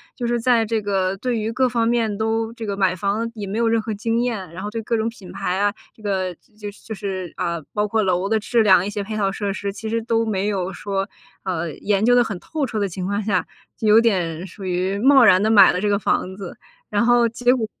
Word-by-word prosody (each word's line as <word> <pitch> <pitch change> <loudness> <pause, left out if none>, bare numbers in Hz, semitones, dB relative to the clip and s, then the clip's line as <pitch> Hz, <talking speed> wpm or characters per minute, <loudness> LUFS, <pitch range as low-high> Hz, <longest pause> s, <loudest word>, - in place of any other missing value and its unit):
就 245 - -4
是 235 0 0
在 235 -2 +3
这 220 0 -1
个 195 -2 0
对 240 +3 -1
于 220 +1 -2
各 255 +2 +2
方 230 -1 +1
面 230 -3 0
都 225 +1 -1
这 230 -1 -7
个 200 -1 -2
买 190 -2 +1
房 205 +5 -1
也 210 -2 -5
没 200 +3 -3
有 235 - +2
任 225 0 +2
何 220 0 -3
经 225 +3 -1
验， 215 -9 -3
然 185 +3 -8
后 210 - -4
对 225 +1 -3
各 230 +1 -1
种 220 0 0
品 220 -5 -8
牌 185 +1 -2
啊， 205 0 +2 0.2
这 - - -20
个 190 -3 -1
就 210 0 -10
是 205 - -20
就 220 - -6
是， 185 -2 -5
啊， 170 -1 -2
包 210 0 0
括 220 +1 +1
楼 185 -1 +1
的 220 +1 +1
质 230 +2 +2
量， 190 -4 +5
一 200 - -3
些 205 0 -3
配 215 +2 -5
套 200 -2 0
设 200 0 -3
施 200 0 -3
其 220 +2 -7
实 230 +1 -1
都 230 0 0
没 200 -2 -1
有 190 -2 -2
说， 195 -1 -3 0.4
啊， 185 -4 -2 0.2
研 205 0 +1
究 245 +2 +5
得 245 - +5
很 205 -6 -5
透 310 - -3
彻 225 -4 -3
的 200 -1 0
情 180 +1 -5
况 200 +2 -1
下， 195 -3 0 0.3
就 220 - -2
有 215 +2 +7
点 180 -7 0
属 190 +2 -10
于 185 +2 -1
贸 265 +4 +6
然 185 -4 +6
地 220 - +2
买 200 -3 +8
了 180 - -2
这 210 - 0
个 200 - +2
房 190 -2 -1
子， 190 -2 -8 0.3
然 210 +1 +1
后 240 0 +4
结 245 +2 +2
果 235 -4 -1
210 Hz, 285 characters per minute, -21 LUFS, 195-230 Hz, 0.4 s, 买